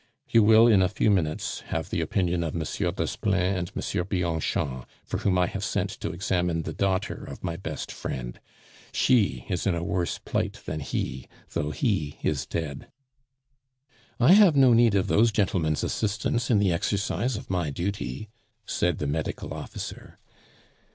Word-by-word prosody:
You 115 - +5
will, 110 +2 +7
in 110 -5 +6
a 90 - +3
few 105 +1 +2
minutes, 80 -6 0
have - - -3
the - - 0
opinion 90 -3 0
of 80 - -3
Monsieur 80 -2 -1
Desplein 95 -2 0
and 90 -1 -4
Monsieur 95 -3 -1
Bianchon, 80 -8 -1 0.2
for - - -3
whom 95 -2 +1
I 90 - +4
have - - -4
sent - - -1
to - - -3
examine 90 -2 0
the - - -5
daughter 95 -1 -1
of - - -9
my 85 - -2
best - - -5
friend; - - -5 0.5
she 120 -6 +2
is 90 -1 -1
in 95 - +2
a 85 - -2
worse 90 -2 -1
plight - - -2
than 75 - -3
he, 65 -2 -3 0.2
though 75 - -1
he 85 - -1
is 70 -4 0
dead." 75 -4 -4 1.3
"I 125 +7 +6
have 200 -6 +7
no 130 -3 +6
need 115 -2 +5
of 95 -1 +2
those 110 +3 +4
gentlemen's 90 -7 +1
assistance 110 +3 -1
in 115 - +4
the 100 -3 +3
exercise 105 +7 -1
of 105 - -8
my 90 -4 0
duty," 85 - -4 0.4
said 90 -3 0
the 75 - -3
medical 75 +2 -3
officer. - - -7
90 Hz, 165 wpm, -26 LUFS, 80-105 Hz, 1.3 s, will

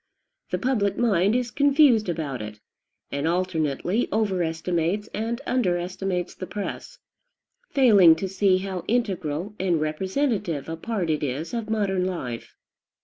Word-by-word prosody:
The - - -1
public 225 -6 0
mind 205 -3 +3
is 245 -1 -1
confused 280 - +4
about 150 -7 -3
it, 105 0 -8 0.5
and 140 +2 -1
alternately 175 - 0
overestimates 180 -1 0
and 230 +3 -3
underestimates 180 -4 -1
the 185 - -7
press, 210 - -6 0.7
failing 205 - +6
to 190 - -3
see 190 0 +2
how 185 -2 -4
integral 195 -6 -1
and 180 -3 +1
representative 190 - -1
a 165 - -3
part 185 -2 -2
it 155 - -1
is 145 - -3
of 230 -2 -3
modern 195 -4 0
life. 125 -11 -5
185 Hz, 130 wpm, -25 LUFS, 165-220 Hz, 0.7 s, failing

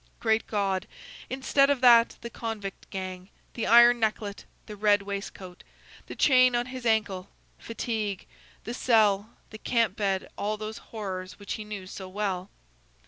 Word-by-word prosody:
Great 220 -1 +1
God! 195 -2 -1 0.4
instead 270 +2 +2
of 285 -2 +2
that, 235 -2 +6
the 235 - -6
convict 220 -5 -6
gang, 185 -1 -6 0.2
the 230 - -3
iron 240 +1 +7
necklet, 215 -2 -2 0.2
the 210 - -8
red 205 -1 +3
waistcoat, 195 -2 -7 0.4
the - - -8
chain 255 -2 +5
on 240 0 +1
his 255 -1 -5
ankle, 205 -4 0 0.3
fatigue, 220 -4 -3 0.4
the 235 - -5
cell, 215 -3 +2
the 215 - -9
camp 230 -5 +1
bed 195 -2 -1
all 215 +1 -1
those 215 +1 -6
horrors 185 -4 -6
which 205 - -6
he 215 - -5
knew 210 -3 -7
so 190 0 -8
well! 190 -1 -3
215 Hz, 150 wpm, -27 LUFS, 195-235 Hz, 0.4 s, iron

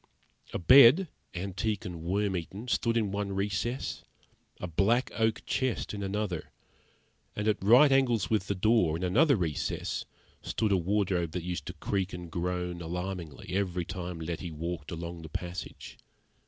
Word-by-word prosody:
A - - -2
bed, 135 - +8 0.3
antique 100 +3 -2
and 85 -3 -6
worm 95 +3 0
eaten, 95 +7 -5
stood 115 -1 +1
in 105 -4 0
one 100 0 -2
recess, 105 +6 -2 0.6
a - - -4
black 100 +9 +2
oak 110 -1 0
chest 130 -5 -1
in 100 - -4
another, 100 -3 -2 0.9
and 105 +1 -2
at 105 -3 +1
right 125 +8 +7
angles 125 -6 +3
with 105 -3 0
the 100 - 0
door, 95 -5 +3
in 90 - -5
another 135 - +4
recess, 85 -7 -2 0.4
stood 110 -2 -1
a - - +5
wardrobe 90 -2 0
that 90 - -3
used 85 -3 -4
to - - -5
creak 95 -1 -2
and 90 -2 -7
groan 90 0 -2
alarmingly 90 -2 -5
every 90 -2 -1
time 90 -2 -5
Letty 85 +2 -4
walked 80 -1 -5
a - - -4
long 85 0 -6
the 80 - -9
passage. 90 +4 -6
95 Hz, 160 wpm, -29 LUFS, 85-110 Hz, 0.9 s, bed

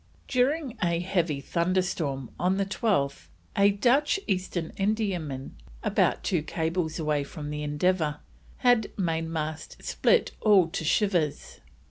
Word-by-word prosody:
During 265 +1 0
a 170 -2 +1
heavy 175 -5 0
thunderstorm 170 -6 -1
on 185 +2 +2
the 200 - +1
12th, 185 -8 0 0.3
a 200 0 +5
Dutch 255 - +2
East 185 -2 -1
Indiaman, 175 -6 -2 0.3
about - - +2
two 175 -4 +1
cables 160 +1 -2
away 150 -3 0
from 145 +1 -7
the 150 0 -4
Endeavour, 150 +1 0 0.5
had 245 -4 +4
mainmast 160 -3 -2
"split 485 - +2
all 195 -6 +5
to 165 - -3
shivers." 170 -3 0
175 Hz, 120 wpm, -27 LUFS, 155-200 Hz, 0.5 s, a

